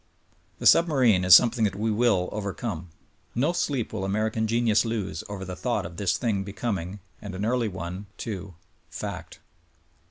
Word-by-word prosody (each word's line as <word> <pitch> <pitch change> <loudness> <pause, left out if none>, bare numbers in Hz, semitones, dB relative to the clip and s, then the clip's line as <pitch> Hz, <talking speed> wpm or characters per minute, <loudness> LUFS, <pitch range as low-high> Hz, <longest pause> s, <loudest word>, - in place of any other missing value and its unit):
The - - -7
submarine 130 - +5
is 90 -1 +9
something 120 -1 +4
that 95 -2 -1
we 110 +2 -1
will 105 -5 +2
overcome. 100 -4 -4 0.5
No 145 +8 +1
sleep 135 -10 -1
will 110 - -3
Ameri 110 +3 -1
can 110 0 0
genius 115 -1 +2
lose 100 -8 -3
over 100 -2 -5
the 90 0 -6
thought 115 -3 -1
of 85 0 -9
this 100 0 +1
thing 105 -5 -1
becoming, 100 -2 -4 0.2
and 100 -3 -7
an 100 +3 -2
early 120 0 +1
one, 95 +1 -6
too 100 -5 -6 0.3
—fact. - - -7
105 Hz, 165 wpm, -26 LUFS, 95-115 Hz, 0.5 s, is